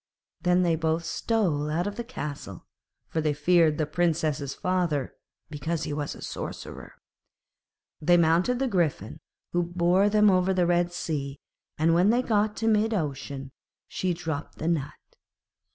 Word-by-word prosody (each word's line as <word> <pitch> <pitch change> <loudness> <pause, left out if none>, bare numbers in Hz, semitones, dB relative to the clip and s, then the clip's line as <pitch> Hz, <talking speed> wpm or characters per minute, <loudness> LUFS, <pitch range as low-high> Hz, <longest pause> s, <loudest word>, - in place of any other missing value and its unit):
Then 180 0 +3
they 170 -2 +2
both 160 +1 -1
stole 170 -10 0
out 165 +4 0
of 205 0 -3
the 235 - -4
castle, 150 - -7 0.4
for 160 - -2
they 150 -1 0
feared 160 0 +3
the 155 - +1
Princess's 155 -3 0
father, 175 -7 -1 0.4
because 160 +2 -3
he 155 -2 -3
was 145 -1 -3
a - - -10
sorcerer. - - -7 1.1
They 175 +3 +5
mounted 170 +9 +3
the 265 +1 0
Griffin, 175 - -1 0.3
who 175 - +1
bore 175 +3 +2
them 210 -1 +5
over 185 0 +2
the 180 -1 +3
Red 175 0 +2
Sea, 145 -5 -3 0.4
and 160 +2 +3
when 180 +4 +4
they 240 +3 +3
got 210 -2 +1
to 225 - -1
mid 220 0 +3
ocean, 140 -4 -4 0.4
she 185 - -2
dropped 160 -3 -4
the 160 - -3
nut. 145 -4 0
170 Hz, 155 wpm, -27 LUFS, 150-185 Hz, 1.1 s, They